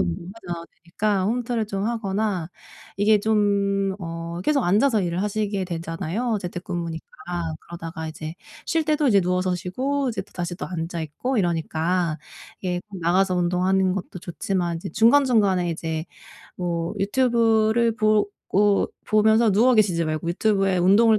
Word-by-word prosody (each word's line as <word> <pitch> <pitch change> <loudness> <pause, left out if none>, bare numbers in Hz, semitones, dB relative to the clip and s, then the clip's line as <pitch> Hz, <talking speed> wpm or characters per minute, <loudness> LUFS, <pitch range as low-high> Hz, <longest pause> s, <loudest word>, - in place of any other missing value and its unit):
운동하지는 130 - -3 0.2
않아도 170 -1 -4 0.2
되니까 195 +2 0
홈트를 235 -1 -1
좀 195 -1 -3
하거나 205 -6 -1 0.5
이게 210 +1 +4
좀 205 -2 +2 0.2
어 165 0 -5
계속 280 0 +2
앉아서 215 +5 +3
일을 175 +2 -1
하시게 205 -2 -1
되잖아요 180 +6 -2
재택근무니까. 175 -2 -5 0.5
그러다가 165 -2 -7
이제 155 +1 -7 0.3
쉴 325 -1 +1
때도 300 -2 +2
이제 200 -3 +5
누워서 180 0 0
쉬고 260 +10 -1
이제 195 -4 -3
또 - - -25
다시 175 -1 -4
또 - - -5
앉아있고 170 - -3
이러니까 170 -1 0 0.4
이게 180 -2 -2
꼭 195 -3 -8
나가서 185 +3 +2
운동하는 185 +2 +2
것도 180 -1 -5
좋지만 175 -1 -2
이제 190 - -6
중간중간에 220 - +4
이제 160 -1 -3 0.5
뭐 170 +1 -2
유튜브를 230 +1 +2
보고 210 -2 +2 0.2
보면서 220 +1 +4
누워 240 +6 +5
계시지 180 -6 +3
말고 155 +1 -2
유튜브에 195 +1 +1
운동을 210 +5 +5
190 Hz, 340 characters per minute, -24 LUFS, 175-215 Hz, 0.5 s, 이제